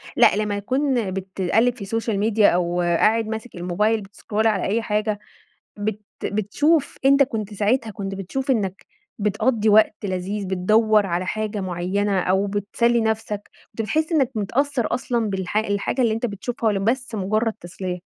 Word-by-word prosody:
لأ - - +6
لما 210 -1 -1
يكون 255 -1 0
بتقلب 195 +5 0
في 240 - -14
السوشيال 225 +1 -2
ميديا 215 0 +4
أو 175 0 0
قاعد 215 +6 +2
ماسك 220 +1 -6
الموبايل 210 +6 0
بتسكرول 205 +2 -2
على 210 -4 +1
أي 220 +4 0
حاجة 210 -1 -1 0.6
بت 210 0 -2 0.2
بتشوف 280 +10 +1
أنت 275 +1 +6
كنت 215 -5 -3
ساعتها 220 +3 +1
كنت 195 -2 -5
بتشوف 260 +9 -3
إنك 195 -6 -1 0.3
بتقضي 215 +2 +1
وقت 215 0 +5
لذيذ، 195 +1 -3
بتدوّر 210 +3 +3
على 175 +1 -1
حاجة 215 0 -2
معيّنة 190 +2 0
أو 190 +2 +1
بتسلي 210 +4 +1
نفسك، 220 -2 -2 0.2
كنت 225 - -4
بتحس 310 +9 -1
إنك 275 -6 +3
متأثّر 245 +4 0
أصلًا 235 -4 -1
بالح 190 +1 -3
الحاجة 215 +4 0
اللي 225 -2 +2
أنت 225 +2 -1
بتشوفها 235 +4 -4
والَّا 210 -2 +2
بس 235 +3 -1
مجرد 215 +3 0
تسلية؟ 180 +1 -5
210 Hz, 155 wpm, -22 LUFS, 195-230 Hz, 0.6 s, لأ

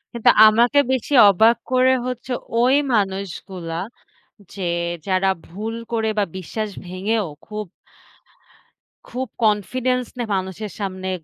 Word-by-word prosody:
কিন্তু 235 - +5 0.2
আমাকে 235 +6 +4
বেশি 260 +3 -2 0.2
অবাক 220 +5 +5 0.2
করে 255 0 +4
হচ্ছে 250 0 -5 0.3
ওই 255 +3 +4 0.2
মানুষগুলা, 190 -4 -3 0.8
যে 195 - -6 0.4
যারা 190 0 +1 0.2
ভুল 215 +6 -5 0.2
করে 225 -1 0
বা 205 - +3
বিশ্বাস 215 +4 -4 0.2
ভেঙেও 200 +4 -1 0.2
খুব 210 -1 -5 1.4
খুব 260 +1 -4 0.2
confidence 250 +4 0
নিয়ে 230 -4 -2
মানুষের 190 +2 -4
সামনে 190 -2 -4
215 Hz, 110 wpm, -21 LUFS, 190-240 Hz, 1.4 s, কিন্তু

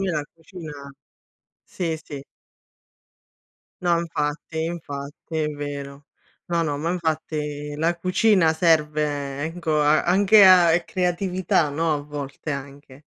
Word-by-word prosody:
me 195 -1 0
la 150 -3 -1
cucina 155 -4 -10 0.7
sì, 165 -3 -3
sì. 145 -3 -8 1.6
No, 170 -1 +3
infatti, 160 -1 -3
infatti 155 -1 -6
è 155 - +1
vero. 145 -1 -6 0.4
No, 170 -1 0
no, 145 -3 -1
ma 165 +4 -2
infatti 150 -3 -3
la 165 +2 0
cucina 185 -1 +3
serve, 150 -4 +1
ecco, 165 -2 -1
a 150 +1 +4
anche 200 +3 +6
a 180 -3 +7
è 170 0 +1
creatività, 180 -3 0
no, 160 +2 0
a 145 - -4
volte 145 0 -7
anche. 140 0 -8
160 Hz, 125 wpm, -23 LUFS, 145-170 Hz, 1.6 s, a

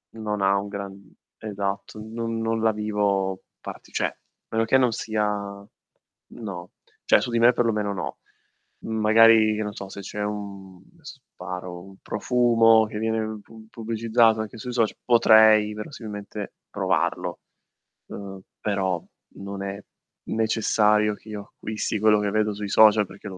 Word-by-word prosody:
non 105 -2 -3
ha 100 +1 +3
un 100 +1 -3
gran 100 -1 -8 0.2
esatto, 100 0 -4
non 115 +1 -4
non 115 0 -1
la 110 -1 +3
vivo 100 -3 -1 0.2
parti - - -10
cioè, - - 0
a - - -4 0.4
meno 110 0 +1
che 130 +4 +4
non 125 -2 +3
sia 110 -1 -1 1.0
no, 90 -6 -8 0.3
cioè - - +5
su - - -3
di 115 - 0
me 120 +2 +7
perlomeno, 105 -4 0
no. 95 - -5 0.7
Magari, 110 0 +5
che 110 - -2
no 105 - -5
so, 100 - -7
se 100 - -8
c'è 105 +2 -5
un 100 -3 -6 0.2
sparo, 90 - -8
un 95 0 -15
profumo 115 -1 +3
che 105 0 -6
viene 110 -1 -2
pu 110 +1 -15
pubblicizzato 115 0 +2
anche 110 +1 -7
sui 125 +3 -6
socia 115 -3 +1
potrei 110 -3 +6
verosimilmente 105 -3 -7 0.2
provarlo, - - -1 0.7
uhm, 95 -1 -8 0.2
però 95 -4 -1 0.3
non 100 0 -7
è 100 0 -5 0.5
necessario 105 -1 +2
che 110 - -17
io 105 -1 -5
acquisti 105 0 -3
quello 105 0 +4
che 105 -1 0
vedo 110 0 +1
sui 105 0 -5
social 105 0 +6
perché 95 +2 -12
l'ho 95 - -9
105 Hz, 150 wpm, -24 LUFS, 100-110 Hz, 1.0 s, me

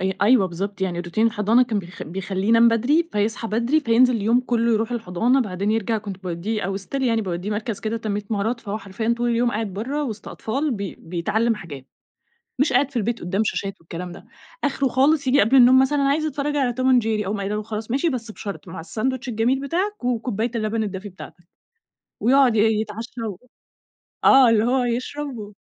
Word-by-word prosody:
أي 190 0 -1
أيوه، 210 -2 +5
بالضبط، 195 +3 -5
يعني 180 -2 -1
روتين 175 +6 0
الحضانة 225 +2 +3
كان 235 -4 -1
بيخ 180 -2 -8
بيخَليه 190 +3 -3
ينام 230 +1 +6
بدري، 275 +9 +2
فيصحى 215 +2 -1
بدري، 235 +8 +1
فينزل 250 -1 +4
اليوم 225 +3 +2
كله 235 -2 +1
يروح 225 +2 0
الحضانة، 235 +4 +1
بعدين 200 -3 -2
يرجع 225 0 0
كنت 200 -2 -8
باودِّيه 185 +5 -3
أو 195 +1 -2
still 270 +8 -4
يعني 230 -3 +1
باوديِّه 180 +1 -4
مركز 215 0 -3
كده 220 +1 -2
تنمية 210 -2 -3
مهارات، 220 +3 -1
فهو 215 -1 -4
حرفيًا 215 +4 -2
طول 240 0 0
اليوم 235 +1 +2
قاعد 215 -3 -3
بره 265 +10 -3
وسط 220 -6 -6
أطفال 275 +7 -2
بي 200 -6 -4
بيتعلم 215 +7 0
حاجات. 145 -10 -9 0.7
مش 280 -1 +2
قاعد 265 +2 +3
في - - -21
البيت 235 +1 -1
قدام 190 +4 -1
شاشات 195 -1 -2
والكلام 170 +2 -7
ده، - - -12 0.4
آخره 275 -1 +1
خالص 275 +2 +2
ييجي 275 +2 +5
قبل 225 +6 +3
النوم 255 0 +7
مثلًا 285 +2 +1
أنا 275 - +2
عايز 310 +3 +1
اتفرج 295 -1 -2
على 260 -4 +1
Tom - - +1 0.2
and - - -8
jerry 215 -1 -1
أقوم 205 +2 -2
قايلة 200 +1 -2
له: 210 - -3
"خلاص 215 +1 -5
ماشي 280 +6 +1
بس 235 -5 -4
بشرط 200 -2 -7
مع 185 0 -7
الساندويتش 255 +9 -3
الجميل 240 +3 +1
بتاعك، 355 +7 -2
وكوباية 235 -2 -1
اللبن 220 0 -1
الدافي 200 0 -5
بتاعتك" 180 -1 -12 0.8
ويقعد 255 0 +4
ي - - +3 0.2
يتعشى 225 +3 -7 1.0
وآه، 265 -3 +7
اللي 220 -1 +3
هو 250 +2 +2
يشربه. 245 -2 -4
225 Hz, 195 wpm, -22 LUFS, 200-250 Hz, 1.0 s, النوم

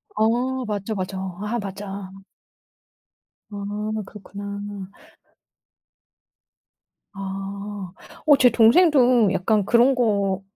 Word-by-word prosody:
어 245 +4 0
맞어, 210 0 -3
맞어. 190 -1 -5
아 225 +3 -2
맞아. 195 -1 -7 1.4
아 205 +1 -4
그렇구나. 200 0 -8 2.5
아. 195 0 -6 0.3
어 290 -3 +6
제 250 - +6
동생도 245 - +5
약간 200 +2 +1
그런 245 +4 +4
거 200 -5 +1
205 Hz, 135 characters per minute, -23 LUFS, 195-235 Hz, 2.5 s, 어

